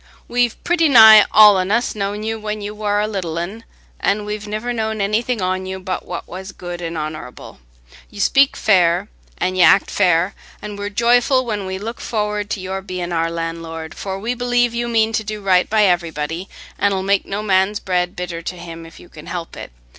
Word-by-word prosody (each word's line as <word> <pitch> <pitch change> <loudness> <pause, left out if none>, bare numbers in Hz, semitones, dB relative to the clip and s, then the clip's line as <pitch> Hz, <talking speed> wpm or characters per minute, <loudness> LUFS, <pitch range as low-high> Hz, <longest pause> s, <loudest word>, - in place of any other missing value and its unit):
We've 245 -1 +1
pretty 335 -2 +2
nigh 220 -4 +9
all 210 -2 +7
on 185 0 -1
us 235 +4 +1
known 205 0 -3
you 225 0 -3
when 215 0 -4
you 205 0 -6
war 210 -1 -1
a 210 - 0
little 185 -6 -4
un, 195 +7 -5 0.4
an' 205 +1 0
we've 210 0 -5
niver 215 +4 -3
known 220 -1 -2
anything 215 +2 0
on 185 0 -2
you 190 0 -5
but 185 -1 -5
what 180 - -6
was 190 +2 -8
good 175 -1 -7
an' 165 -1 -4
honorable. 155 -5 -7 0.5
You 205 - -12
speak 275 +7 +3
fair 185 -1 +2 0.3
an' 185 0 -1
y' 185 - +2
act 175 +3 +5
fair, 180 0 +2 0.3
an' 210 0 -7
we're 205 0 -4
joyful 245 +4 +2
when 205 -4 -3
we 190 0 -4
look 225 +4 -7
forrard 210 -2 -2
to 220 - -3
your 190 +1 -4
being 180 -2 -5
our 165 -1 0
landlord, 165 -1 -5
for 190 -1 -5
we 225 +5 -2
'lieve 245 -1 +1
you 240 0 -2
mean 225 -1 +1
to 215 - 0
do 215 0 -5
right 185 -2 +2
by 215 -1 +3
everybody, 170 -1 -1 0.3
an' 200 -1 +2
'ull 190 -1 -2
make 200 0 +1
no 205 +2 -3
man's 195 0 +2
bread 180 -1 -1
bitter 175 -2 -5
to 180 - -5
him 165 -1 -9
if 165 - -15
you - - -15
can 155 -1 -13
help 170 -1 -6
it. - - -9
200 Hz, 210 wpm, -19 LUFS, 180-215 Hz, 0.5 s, nigh